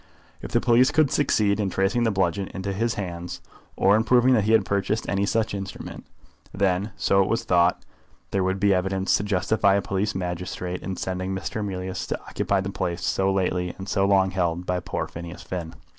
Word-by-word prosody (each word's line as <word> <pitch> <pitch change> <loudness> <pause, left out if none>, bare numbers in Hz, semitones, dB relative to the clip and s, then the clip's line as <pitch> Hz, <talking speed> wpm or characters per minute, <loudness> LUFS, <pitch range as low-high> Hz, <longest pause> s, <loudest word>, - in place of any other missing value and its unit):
If - - -7
the - - +3
police 120 +2 +4
could 155 -4 +3
succeed 105 -8 +2
in 100 -2 0
tracing 95 +6 +1
the - - +3
bludgeon 95 -1 0
into 100 +1 -3
his 115 +4 -1
hands, 90 -3 -5 0.4
or 100 +2 +4
in 110 - +3
proving 125 +2 +4
that 110 -5 +3
he 110 - +3
had 110 -4 +4
purchased 100 +3 -1
any 100 0 0
such 110 0 0
instrument, 95 -1 -7 0.4
then, 100 +1 0
so 100 - +3
it 95 - +1
was 115 +2 0
thought, 90 0 +2 0.5
there 95 - +1
would 95 +1 0
be 100 0 +4
evidence 95 +1 +1
to - - -3
justify 100 +1 +2
a 100 - +2
police 100 +2 -1
magistrate 90 0 -4
in 95 -1 -5
sending 95 +1 -3
Mr. 95 +3 -4
Emilius 95 -2 -4
to - - -3
occupy 100 -1 -1
the 95 +1 -4
place 85 -2 -3
so 95 0 +1
lately 90 -2 -1
and 95 - -8
so 95 0 +1
long 95 -1 +3
held 90 -1 -1
by 90 0 0
poor - - -3
Phineas 85 +1 -8
Finn. 85 -3 -5
95 Hz, 205 wpm, -24 LUFS, 90-105 Hz, 0.5 s, police